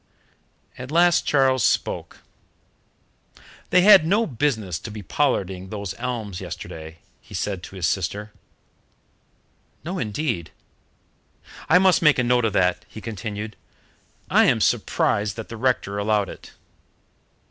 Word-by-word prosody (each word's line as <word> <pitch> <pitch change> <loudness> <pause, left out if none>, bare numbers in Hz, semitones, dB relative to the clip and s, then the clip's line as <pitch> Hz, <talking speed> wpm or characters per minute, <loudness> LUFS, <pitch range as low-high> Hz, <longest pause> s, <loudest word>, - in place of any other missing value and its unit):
At 125 +1 -7
last 175 +2 +3
Charles 130 -4 +3
spoke. - - -1 1.5
"They 180 - +5
had 195 -3 +8
no 205 +8 +2
business 110 - -1
to - - -8
be 105 -1 -8
pollarding 95 -7 -1
those 100 -3 -5
elms 115 -7 -4
yesterday," 80 0 -8 0.2
he - - -12
said 100 -3 -3
to 95 - -11
his 90 -3 -2
sister. 100 +5 -2 1.5
"No 180 +5 -4
indeed." 105 - -2 1.2
"I 170 - +7
must 185 0 +4
make 150 -3 +5
a 125 - +2
note 120 -1 +2
of 110 - 0
that," 90 -1 +1
he - - -9
continued. 110 -1 -6 0.7
"I - - +4
am - - +3
surprised 105 0 +1
that 110 -1 -8
the 115 - -7
rector 110 -5 0
allowed 105 -1 +1
it." - - -12
110 Hz, 130 wpm, -23 LUFS, 100-140 Hz, 1.5 s, had